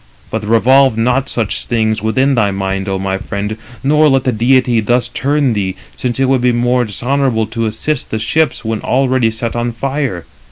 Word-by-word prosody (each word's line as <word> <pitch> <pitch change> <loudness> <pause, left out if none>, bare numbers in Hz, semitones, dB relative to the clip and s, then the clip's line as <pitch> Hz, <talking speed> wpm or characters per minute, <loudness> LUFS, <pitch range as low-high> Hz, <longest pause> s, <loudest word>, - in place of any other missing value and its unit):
But 110 -1 -3
revolve 120 +3 +4
not 125 +4 +1
such 115 -4 -2
things 110 -2 0
within 130 +6 +1
thy 110 -5 +2
mind, 95 0 -2
O 95 - -1
my 95 0 -2
friend, 105 +1 -4 0.3
nor 150 +2 +4
let 135 -1 +2
the 130 - +1
deity 120 +1 +2
328 - - -8
thus 120 0 +2
turn 140 -2 0
thee, 95 -3 -2 0.2
since 125 0 -3
it 135 - +3
would 130 -1 +2
be 125 0 +3
more 120 +1 +1
dishonourable 120 +1 0
to 115 +1 -3
assist 125 +6 -3
the 110 - -2
ships 125 +4 0
[when 110 -1 -2
already] 130 -2 +1
set 110 +1 -4
on 120 0 -1
fire. 135 - -3
120 Hz, 195 wpm, -15 LUFS, 110-130 Hz, 0.3 s, revolve